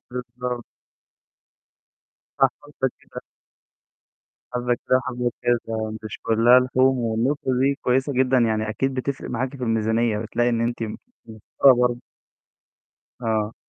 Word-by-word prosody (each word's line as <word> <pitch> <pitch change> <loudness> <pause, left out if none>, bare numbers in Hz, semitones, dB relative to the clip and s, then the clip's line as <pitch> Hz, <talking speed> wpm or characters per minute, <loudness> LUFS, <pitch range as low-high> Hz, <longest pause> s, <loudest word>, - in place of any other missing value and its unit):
بالضبط. 125 -1 -5 1.8
صح، 135 - +6
حبة 140 -3 -3
كده. - - -10 1.3
حبة 120 0 +1
كده 130 - +1
وحبة 125 -1 -2
كده 115 -2 -1
مش 110 -1 -7
كلّها 115 +3 +5
لحوم، 130 +1 +2
والنقطة 120 +4 0
دي 140 +1 +3
كويسة 130 +3 +1
جدًا 130 0 +3
يعني، 110 -2 +1
أكيد 135 +5 -1
بتفرق 135 +1 -4
معاكِ 130 +3 -3
في 130 - -9
الميزانية، 115 0 +1
بتلاقي 115 +2 0
إن 115 -1 0
أنتِ 120 0 -1
م 110 -1 -4 0.3
موفَرة 110 +5 +3
برضه. 120 -1 +1 1.2
آه. 110 -1 -1
120 Hz, 125 wpm, -23 LUFS, 115-130 Hz, 1.8 s, صح